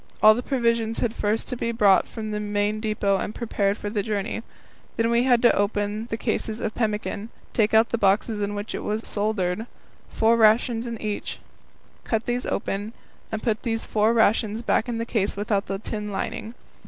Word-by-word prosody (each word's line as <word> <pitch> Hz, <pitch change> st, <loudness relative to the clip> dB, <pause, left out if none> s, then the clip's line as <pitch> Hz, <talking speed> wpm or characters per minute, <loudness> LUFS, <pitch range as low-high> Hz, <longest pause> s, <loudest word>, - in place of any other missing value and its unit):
All 215 Hz, 0 st, +10 dB
the 240 Hz, -, -2 dB
provisions 235 Hz, -4 st, 0 dB
had 230 Hz, -2 st, 0 dB
first 210 Hz, +1 st, -1 dB
to -, -, -2 dB
be 235 Hz, -1 st, -2 dB
brought 205 Hz, -4 st, +4 dB
from 215 Hz, -2 st, -6 dB
the 210 Hz, -, -2 dB
main 205 Hz, 0 st, -1 dB
depot 210 Hz, -2 st, +1 dB
and 210 Hz, -, -4 dB
prepared 205 Hz, -3 st, 0 dB
for -, -, -6 dB
the 205 Hz, 0 st, -1 dB
journey. 210 Hz, +2 st, -2 dB, 0.6 s
Then 230 Hz, 0 st, +2 dB
we 235 Hz, +1 st, +3 dB
had 245 Hz, -2 st, +4 dB
to 240 Hz, -, +6 dB
open 205 Hz, +2 st, -1 dB
the 225 Hz, -, -3 dB
cases 220 Hz, -1 st, -2 dB
of 220 Hz, -2 st, -2 dB
pemmican, 215 Hz, -1 st, -2 dB, 0.2 s
take 220 Hz, -1 st, +2 dB
out 225 Hz, +1 st, +5 dB
the 235 Hz, -, -1 dB
boxes 205 Hz, +2 st, +2 dB
in 205 Hz, 0 st, -2 dB
which 205 Hz, +2 st, -5 dB
it -, -, -3 dB
was 215 Hz, +2 st, -2 dB
soldered, 210 Hz, 0 st, -1 dB, 0.4 s
four 225 Hz, +1 st, +3 dB
rations 225 Hz, +1 st, +3 dB
in 230 Hz, -2 st, -5 dB
each, 210 Hz, -1 st, -4 dB, 0.7 s
cut 225 Hz, -1 st, -1 dB
these 245 Hz, +1 st, -2 dB
open, 205 Hz, +3 st, -2 dB, 0.4 s
and 220 Hz, -1 st, -3 dB
put 220 Hz, -3 st, 0 dB
the 225 Hz, -2 st, -1 dB
four 220 Hz, 0 st, +1 dB
rations 220 Hz, 0 st, +2 dB
back 235 Hz, +1 st, +1 dB
in 235 Hz, -, -2 dB
the 230 Hz, -, -2 dB
case 205 Hz, -4 st, -1 dB
without 205 Hz, -1 st, 0 dB
the 195 Hz, -, -2 dB
tin 210 Hz, 0 st, -5 dB
lining. 215 Hz, +3 st, -4 dB
220 Hz, 195 wpm, -25 LUFS, 205-230 Hz, 0.7 s, All